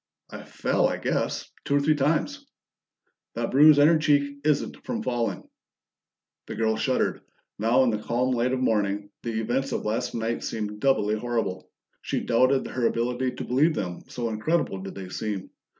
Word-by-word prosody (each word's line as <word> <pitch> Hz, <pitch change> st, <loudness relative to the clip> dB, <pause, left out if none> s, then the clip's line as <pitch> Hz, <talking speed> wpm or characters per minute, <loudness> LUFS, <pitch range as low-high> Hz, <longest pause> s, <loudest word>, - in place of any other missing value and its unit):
"I -, -, -7 dB
fell, -, -, +1 dB
I -, -, -2 dB
guess. -, -, -2 dB, 0.2 s
Two 140 Hz, -, 0 dB
or -, -, +4 dB
three 150 Hz, +2 st, +3 dB
times." 155 Hz, -, 0 dB, 0.9 s
"That -, -, -2 dB
bruise 150 Hz, +2 st, +7 dB
on 145 Hz, -, +7 dB
your 160 Hz, 0 st, +5 dB
cheek 145 Hz, -2 st, +1 dB
isn't 150 Hz, -1 st, 0 dB
from 230 Hz, -2 st, -3 dB
falling." 120 Hz, -, -2 dB, 1.0 s
The -, -, -6 dB
girl 110 Hz, 0 st, +1 dB
shuddered. 130 Hz, +4 st, 0 dB, 0.4 s
Now 115 Hz, +5 st, +4 dB
in 125 Hz, -, +2 dB
the 105 Hz, -, -2 dB
calm 125 Hz, +3 st, 0 dB
light 125 Hz, +1 st, +1 dB
of 130 Hz, -, 0 dB
morning, 105 Hz, -4 st, 0 dB
the 115 Hz, -2 st, -3 dB
events 130 Hz, +5 st, -1 dB
of -, -, -3 dB
last 120 Hz, +3 st, -2 dB
night 115 Hz, 0 st, -2 dB
seemed 105 Hz, -1 st, -4 dB
doubly 105 Hz, -5 st, +2 dB
horrible; 110 Hz, -4 st, -2 dB, 0.3 s
she -, -, -2 dB
doubted 130 Hz, +3 st, +2 dB
her 120 Hz, -2 st, 0 dB
ability 125 Hz, +2 st, -1 dB
to -, -, -6 dB
believe 150 Hz, +6 st, +2 dB
them, 90 Hz, -3 st, -4 dB
so 120 Hz, -2 st, -3 dB
incredible 110 Hz, -, -1 dB
did 95 Hz, -, -7 dB
they 95 Hz, -2 st, -7 dB
seem. 100 Hz, 0 st, -4 dB
120 Hz, 175 wpm, -26 LUFS, 110-140 Hz, 1.0 s, bruise